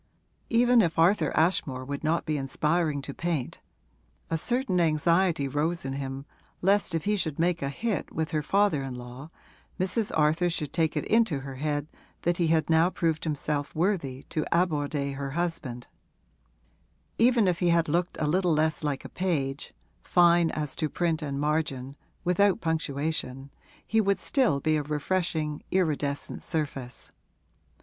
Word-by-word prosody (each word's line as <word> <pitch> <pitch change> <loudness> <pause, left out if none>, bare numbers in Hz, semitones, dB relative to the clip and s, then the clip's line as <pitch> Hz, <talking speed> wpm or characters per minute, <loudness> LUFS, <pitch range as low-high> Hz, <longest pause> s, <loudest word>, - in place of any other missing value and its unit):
Even 240 +1 +5
if 165 -4 0
Arthur 165 -1 +4
Ashmore 145 -6 +1
would 140 +2 -5
not 160 +2 +1
be 155 - -1
inspiring 150 +2 0
to 140 - -6
paint 165 -6 -3 0.7
(a 165 - +2
certain 240 - 0
anxiety 165 -1 +2
rose 150 +4 -1
in 135 - -3
him 135 0 -5 0.3
lest 195 -2 +2
if 160 - -2
he 210 +1 +2
should 160 -7 -2
make 170 +1 +1
a 140 - -1
hit 215 +5 -3
with 160 -1 -2
her 155 - 0
father 195 -2 +2
in 135 -2 -5
law 125 +4 -9 0.5
Mrs. 190 +4 0
Arthur 160 +3 +3
should 155 -3 -4
take 160 -2 +1
it - - -1
into 220 -11 +2
her 135 -1 -7
head 145 0 -1 0.4
that 175 0 +1
he 170 - +2
had 160 -1 +2
now 165 +2 +4
proved 165 -4 -1
himself 150 -1 -2
worthy 155 -7 -1
to 155 - -2
aborder 145 -5 0
her 140 -1 -4
husband); 160 -9 -3 1.3
even 235 -3 +4
if 180 -1 +1
he 175 - +2
had 170 -1 +3
looked 175 +4 0
a 155 - 0
little 175 +2 +2
less 155 +1 +1
like 145 -3 -2
a - - -7
page 145 -7 -2 0.3
(fine 170 -1 +4
as 150 -3 -4
to 155 - -1
print 165 -1 0
and 140 -2 -3
margin) 145 -3 -1 0.3
without 180 +2 +3
punctuation, 145 -4 -2 0.3
he 220 0 +2
would 200 -1 +2
still 245 - +1
be 155 +2 +1
a - - 0
refreshing, 150 0 -1
iridescent 150 -6 -1
surface. 140 -5 -4
160 Hz, 160 wpm, -27 LUFS, 145-175 Hz, 1.3 s, Even